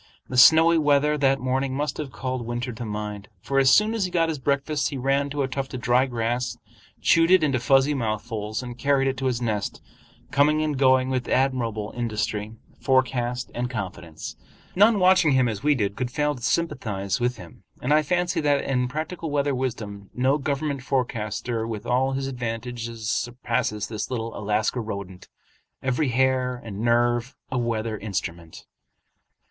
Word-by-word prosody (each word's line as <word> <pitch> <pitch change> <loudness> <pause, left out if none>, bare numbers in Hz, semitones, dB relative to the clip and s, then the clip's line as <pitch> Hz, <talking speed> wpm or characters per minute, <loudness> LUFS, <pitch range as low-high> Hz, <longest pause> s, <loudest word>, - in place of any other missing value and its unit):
The 130 - -4
snowy 160 +6 +7
weather 150 0 +3
that 135 -2 +2
morning 130 +1 -1
must 145 0 -2
have 145 -3 -5
called 130 -2 -4
winter 120 +1 -3
to 115 +2 -6
mind; 105 -1 -5
for 135 0 0
as 135 -1 +5
soon 210 +10 +5
as 220 -4 0
he - - -3
got 165 -2 +1
his 155 -3 -3
breakfast, 140 +2 0
he 140 - -5
ran 135 +2 +1
to 145 0 -1
a - - 0
tuft 135 0 -4
of 125 - -5
dry 125 +3 +3
grass, 120 0 -2 0.5
chewed 165 0 +4
it 185 -3 +6
into 135 -4 +2
fuzzy 135 +3 +3
mouthfuls, 110 -2 -3
and 120 -1 -8
carried 140 -1 +2
it 135 - 0
to 135 +1 -1
his 125 -1 -1
nest, 105 -3 -2 0.5
coming 150 +3 +3
and 150 -3 -1
going 130 -1 +4
with 130 -1 -1
admirable 120 -5 0
industry, 110 -2 -2 0.2
forecast, 125 -2 0
and 125 +1 -2
confidence. 90 -8 -6 0.4
None 210 +3 +5
watching 185 -5 +5
him 130 -1 +3
as 110 -3 -3
we 150 0 +3
did 100 -5 -1
could 125 -1 -2
fail 150 +3 0
to 125 - -11
sympathize 110 - -1
with 120 0 0
him; 85 -5 -13 0.2
and 135 +4 +1
I 155 - +5
fancy 175 +3 0
that 145 -2 +2
in 125 -2 0
practical 160 +4 -4
weather 145 -1 +1
wisdom 110 -6 -4
no 130 +4 +2
government 140 -1 -2
forecaster 120 -3 -2
with 110 -1 -5
all 130 +3 +1
his 135 0 -2
advantages 115 -2 -5
surpasses 120 -3 -1
this 105 -1 -5
little 115 -3 -4
Alaska 105 +4 0
rodent, 100 -5 -6 0.6
every 130 +2 +1
hair 130 0 +1
and 100 -3 -6
nerve 120 +2 +1 0.2
a 130 - 0
weather 115 -2 -2
instrument. 85 -5 -5
125 Hz, 175 wpm, -24 LUFS, 115-140 Hz, 0.6 s, snowy